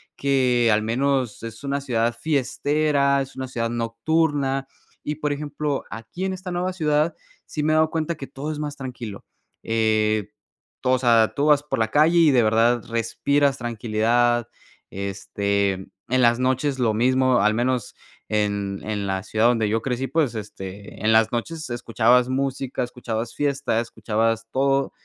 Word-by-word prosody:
que 125 -4 +2
al 105 - +2
menos 125 0 0
es 115 +2 -8
una 140 0 -1
ciudad 120 -3 0
fiestera, 145 -1 +1
es 135 0 -7
una 130 0 -4
ciudad 115 -2 -2
nocturna. 135 +4 0 0.4
Y, 150 - -3
por 150 -1 -2
ejemplo, 145 -1 -3
aquí 115 +12 -6
en 190 - -1
esta 185 0 -6
nueva 180 +1 -1
ciudad, 155 -2 +1 0.3
sí 150 - -4
me 155 - +2
he - - +3
dado 155 0 +4
cuenta 165 0 -2
que 135 - -8
todo 145 +3 -5
es 150 - -5
más 150 -1 -4
tranquilo. 125 -7 -7 0.4
Eh, 110 -2 +1 0.5
tú, 130 - -1
o 130 0 +3
sea, 115 -3 +4
tú 140 - 0
vas 150 -1 +4
por 150 - -3
la 110 - +2
calle 155 +5 +4
y 160 -3 +6
de 125 -3 +4
verdad 115 +2 +3
respiras 140 +5 +1
tranquilidad, 120 0 +1 0.4
este, 100 0 -1 0.4
en 130 0 +2
las 120 0 +4
noches 130 +2 0
lo 115 -3 +2
mismo, 130 +2 +3
al 105 +1 +3
menos 120 0 -1 0.3
en 100 -2 -1
en 105 -2 -3
la 95 0 -2
ciudad 110 +2 +2
donde 115 -3 +2
yo 110 +1 0
crecí, 130 +1 -2
pues, 135 -3 0
este, 100 -1 -8
en 110 - +4
las 110 0 +4
noches 155 +6 -4
escuchabas 120 +1 +2
música, 135 -1 -2
escuchabas 115 -2 -4
fiesta, 140 -5 0
escuchabas 115 -1 -1
todo 135 0 +1
125 Hz, 165 wpm, -23 LUFS, 115-140 Hz, 0.5 s, y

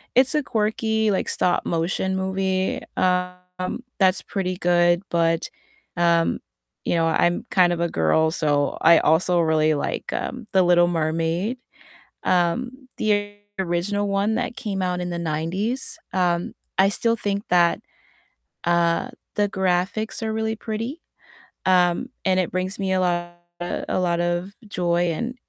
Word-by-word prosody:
it's 260 +3 +4
a 300 - +2
quirky, 220 -2 0
like, 190 - -1
stop-motion 180 +2 0
movie, 190 0 -1 0.2
um, 180 +4 -1 0.2
that's 190 -1 +3
pretty 185 -2 -3
good, 175 0 +3
but, 165 -1 +1 0.5
um, 170 -1 +2 0.5
you - - +1
know, 165 - +2
I'm 175 +2 +1
kind 180 -2 +4
of 170 - -3
a 170 - +1
girl, 120 - +2
so 145 -3 0
I 170 -1 +7
also 175 +3 +3
really 155 -1 +3
like, 145 - -3
um, 250 -2 -4
The 190 -1 +5
Little 175 0 +5
Mermaid, 165 +6 -1 0.7
um, 245 +10 0
the 205 -1 0 0.3
original 190 +3 -1
one 200 +2 +1
that 240 - -2
came 195 -3 -3
out 180 -1 -1
in 180 - -3
the 170 -1 -3
'90s, 170 +10 -2 0.2
um, 175 -2 0 0.2
I 195 +1 +5
still 230 +3 +1
think 205 -2 -2
that, 175 -1 +4 0.9
uh, 170 +6 +2 0.3
the 205 -1 +2
graphics 190 +4 -1
are 220 -1 -1
really 220 0 -1
pretty, 230 +9 -5 0.6
um, 180 -2 +3
and 185 -1 +2
it 180 - -1
brings 185 +2 -2
me 190 -1 -1
a 185 - +2
lot 175 -1 0 0.6
a - - 0
lot 175 -1 +1
of 175 +2 -1 0.2
joy, 175 -2 +1
and 235 +9 -3
180 Hz, 145 wpm, -23 LUFS, 170-205 Hz, 0.9 s, I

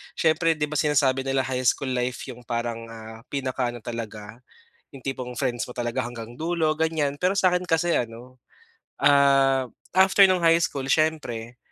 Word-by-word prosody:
siyempre 160 +1 +2
'di 150 - -3
ba, 150 -1 -1
sinasabi 135 -3 +2
nila 135 0 +1
high 130 -1 -2
school 130 +2 +1
life 125 0 -2
'yong 125 -2 -9
parang, 115 -1 -3
ah, 110 0 -10
pinaka 130 -2 -2
ano 120 - -8
talaga, 110 -1 -7 0.6
'yong 135 - -12
tipong 125 -2 -4
friends 125 -3 -1
mo - - -6
talaga 120 +2 -2
hanggang 120 -1 -8
dulo, 160 -1 0
ganyan. 160 -3 0
Pero 180 +4 +1
sa'kin 180 -2 +3
kasi 170 +1 +1
ano, 120 +2 -7 0.6
ah, 135 -2 +4 0.3
after 195 +1 +7
no'ng 185 -1 +2
high 165 0 +6
school 140 -5 -2
siyempre, 130 -7 0
135 Hz, 165 wpm, -25 LUFS, 120-155 Hz, 0.6 s, after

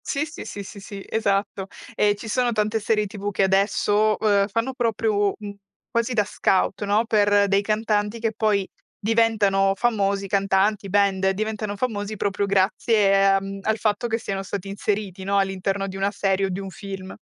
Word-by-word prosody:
Sì, 280 +2 -1
sì, 300 - -9
sì, 200 - -6
sì, 200 - -10
sì, 195 0 -9
esatto. 200 -2 -1 0.3
E 205 -1 +3
ci 215 +2 -9
sono 245 +2 +1
tante 215 0 0
serie 210 0 +1
TV 205 0 -5
che 195 -1 0
adesso, 205 +2 +2
uhm, 200 -2 +3
fanno 230 +5 -2
proprio, 220 -4 +1
mhmm, 205 -1 -7 0.4
quasi 235 0 0
da 215 -3 +3
scout, 195 0 0
no, 210 +3 +2
per 205 -2 +3
dei 195 0 +2
cantanti 210 +1 0
che 225 -1 -1
poi 210 -3 +1 0.3
diventano 205 -3 +2
famosi 200 -4 0
cantanti, 195 +1 +1
band 195 -1 +2
diventano 215 +1 -3
famosi 210 -2 -3
proprio 200 +1 -1
grazie, 195 0 +3
uhm, 195 0 -7
al 220 +2 0
fatto 215 +1 0
che 225 -1 0
siano 195 -4 -4
stati 195 0 -5
inseriti, 200 -1 -3
no, 200 +1 0
all'interno 195 0 -1
di 190 0 -6
una 195 +1 0
serie 195 -1 0
o - - -5
di 185 +1 -3
un 195 -1 -6
film. 195 -1 -8
205 Hz, 175 wpm, -23 LUFS, 195-215 Hz, 0.4 s, E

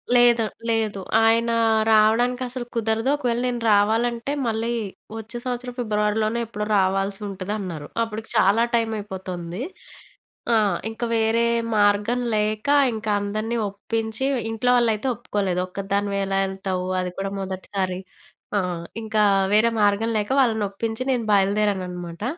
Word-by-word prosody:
లేద 240 -1 +6 0.3
లేదు. 220 -3 0 0.2
ఆయన 230 +1 +3 0.4
రావడానికి 230 +4 +3
అసలు 250 -1 -5
కుదరదు. 225 +2 0
"ఒకవేళ 240 -4 -1
నేను 240 -1 -2
రావాలంటే 230 +5 +1 0.2
మళ్ళీ 225 +1 -1 0.5
వచ్చే 225 +2 -7
సంవత్సరం 245 0 -4
ఫిబ్రవరిలోనే 215 0 0
ఎప్పుడో 210 -1 -4
రావాల్సి 195 +1 0
ఉంటది" 195 +1 -5
అన్నారు. 165 -6 -6 0.2
అప్పటికి 225 0 -6
చాలా 205 +5 +4
టైమ్ 225 -1 +1
అయిపోతుంది. 185 -2 -6 0.9
ఆ! - - +5 0.3
ఇంకా 225 +2 -4
వేరే 225 +1 +2 0.3
మార్గం 205 +4 +3 0.2
లేక 215 +3 -1 0.3
ఇంకా 215 -1 -3
అందరిని 215 +3 -2
ఒప్పించి. 220 +4 -3 0.2
ఇంట్లో 225 +3 -1
వాళ్ళు 235 -2 +3
అయితే 220 +6 -4
ఒప్పుకోలేదు. 195 -5 -1
"ఒక్కదానివి 200 +1 -2
ఎలా 195 0 0
వెళ్తావు? 190 -1 -3 0.2
అది 180 -1 -3
కూడా 195 0 -2
మొదటిసారి" 190 -1 -3 0.6
ఆ! - - +4 0.4
ఇంకా 215 -1 0 0.3
వేరే 230 +2 +5
మార్గం 205 +3 +2
లేక 205 -1 -2
వాళ్ళని 220 -4 +2
ఒప్పించి 225 +4 -3
నేను 240 -3 0
బయలుదేరాను 200 -1 +2
అన్నమాట. 175 +1 -7
215 Hz, 130 wpm, -23 LUFS, 195-230 Hz, 0.9 s, లేద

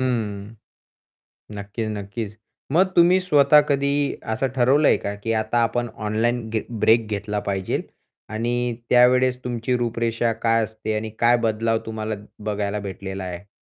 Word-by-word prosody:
हं. 110 -4 -2 1.0
नक्कीच 100 +2 -4
नक्कीच. 105 +1 -6 0.3
मग 175 +6 +5
तुम्ही 175 +2 +6
स्वतः 150 -4 +5
कधी 140 0 +2 0.4
असं 135 +5 0
ठरवलंय 135 +4 +4
का 100 - -4
की 115 - -1
आता 110 +2 -2
आपण 120 +1 -1 0.2
ऑनलाईन 115 +2 0
घे 110 -1 -1 0.2
ब्रेक 110 0 +4
घेतला 105 0 -2
पाहिजे 95 -1 -1 0.5
आणि 120 +2 -1 0.4
त्यावेळेस 125 +1 +5
तुमची 120 0 -1
रूपरेषा 115 -1 0 0.2
काय 115 0 +3
असते 110 0 -4
आणि 110 +1 -3
काय 120 +1 +5
बदलाव 115 0 +1
तुम्हाला 110 -1 -4 0.3
बघायला 105 0 -2
भेटलेला 95 -1 -6
आहे? 90 +2 -7
115 Hz, 135 wpm, -23 LUFS, 105-120 Hz, 1.0 s, तुम्ही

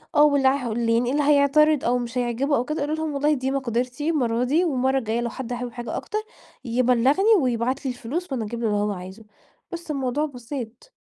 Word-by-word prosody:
آه، 295 - +7
واللي 285 -3 +4
عه 265 -3 +1
واللي 230 +1 0
يعني 245 +1 0
اللي 290 +1 +1
هيعترض 295 +1 +4
أو 245 +1 +2
مش 240 0 -4
هيعجبه 250 +4 0
أو 245 - -1
كده 305 -1 -3
قولي 300 +2 -1
لهم: 315 -2 -3
"والله 295 +2 +2
دي 265 -1 -1
مقدرتي 255 +3 -2
المرّة 245 -6 +1
دي، 310 +8 +2
والمرّة 265 -3 +1
الجاية 230 -1 -1
لو 235 - -2
حد 250 -1 -6
حابب 245 0 -4
حاجة 240 0 -6
أكتر 425 - -4 0.5
يبلّغني 255 - +3
ويبعت 250 +2 -1
لي 260 - 0
الفلوس 275 +8 -5
وأنا 235 -5 -2
أجيب 235 +2 -5
له 230 - -1
اللي 210 - +1
هو 205 0 0
عايزه" 190 +3 -8 0.5
بس 340 -2 -6
الموضوع 275 +2 -1
بسيط. 250 - -8
255 Hz, 210 wpm, -24 LUFS, 235-290 Hz, 0.5 s, آه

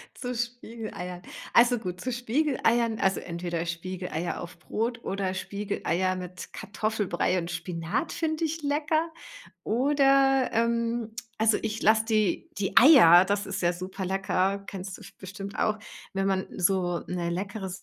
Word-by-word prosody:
Zu 250 -1 -4
Spiegeleiern. 225 -6 -5 0.3
Also 240 0 +5
gut, 180 -4 -5
zu 255 +6 -3
Spiegeleiern, 240 -2 +1
also 190 -1 +2
entweder 170 -1 -4
Spiegeleier 175 0 -4
auf 170 0 -9
Brot 230 +8 -3
oder 195 -1 -2
Spiegeleier 190 -2 -1
mit 180 0 -8
Kartoffelbrei 205 -4 -1
und 170 -1 -5
Spinat 170 - -3
finde 320 -1 -1
ich 320 +1 -3
lecker. 310 +3 0 0.5
Oder, 270 +1 +3
ähm, 235 0 0 0.3
also, 220 -1 +4
ich 220 -1 -3
lasse 220 +1 +4
die 215 -5 +1
die 195 - -2
Eier, 190 - +9
das 200 +1 0
ist 195 -1 -3
ja 175 0 +2
super 185 +2 -5
lecker, 195 +1 0
kennst 190 -1 -6
du - - -16
f - - -12
bestimmt 195 +1 -8
auch, 215 0 +1 0.4
wenn 195 0 0
man 190 -1 0
so 180 -2 +1
'ne 175 -1 -2
leckere 195 +2 -4
200 Hz, 145 wpm, -27 LUFS, 180-235 Hz, 0.5 s, Eier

